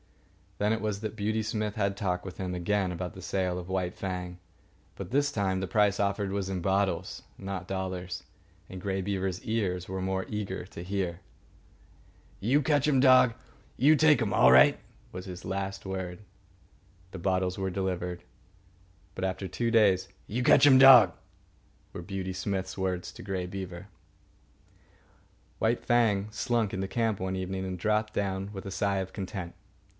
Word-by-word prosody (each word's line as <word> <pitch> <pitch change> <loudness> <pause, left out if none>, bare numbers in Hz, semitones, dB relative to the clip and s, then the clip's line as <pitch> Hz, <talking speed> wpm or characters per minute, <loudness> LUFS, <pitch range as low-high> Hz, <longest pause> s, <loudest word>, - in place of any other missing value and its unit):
Then 105 +2 +1
it 110 - -2
was 105 -2 -2
that 110 -1 -4
Beauty 110 +1 -1
Smith 105 -1 -2
had 100 -2 0
talk 90 -3 -1
with 95 - -8
him 90 -1 -3
again 95 +1 0
about 90 0 -5
the 95 - -10
sale 90 0 -1
of 90 0 -7
White 90 -1 -2
Fang; 90 -2 -5 0.6
but - - -7
this 145 +3 +1
time 95 -3 0
the 95 - -3
price 100 +1 +2
offered 100 0 0
was 100 -1 -2
in 95 -2 -3
bottles, 95 +2 -1
not 95 -2 -5
dollars, 95 -1 -4 0.5
and 95 -1 -8
Grey 95 -1 -2
Beaver's 95 -1 -2
ears 95 -5 -1
were 95 0 -4
more 95 0 -1
eager 100 -4 -4
to 85 - -9
hear. 90 -2 -2 1.2
"You 130 +8 +2
ketch 145 0 +2
um 140 -3 +3
dog 130 -2 +6 0.4
you 145 +5 +6
take 150 -4 +5
um 105 -3 0
all 65 -8 +6
right," 65 +1 +7 0.3
was 90 0 -7
his 90 -2 -8
last 95 +1 -3
word. 95 -1 -4 0.9
The 95 - -7
bottles 90 0 0
were 95 -1 -1
delivered, 90 -2 -3 0.9
but 95 - -5
after 95 0 -2
two 115 +4 -2
days. 95 -5 +4 0.2
"You 125 +4 -2
ketch 145 - +6
um 135 -2 +8
dog," 135 -4 +9 0.8
were 90 - -6
Beauty 95 0 -4
Smith's 95 0 -3
words 90 -2 -2
to - - -11
Grey 95 -2 -3
Beaver. 95 0 -7 1.7
White 115 +2 0
Fang 110 -4 +2
slunk 115 -1 0
into 95 0 -2
camp 115 -1 0
one 95 0 -2
evening 95 0 -3
and 90 -1 -5
dropped 110 +2 0
down 95 0 -2
with 95 - -7
a - - -5
sigh 100 +1 0
of 95 0 -4
content. 95 -3 -5
95 Hz, 170 wpm, -29 LUFS, 95-105 Hz, 1.7 s, dog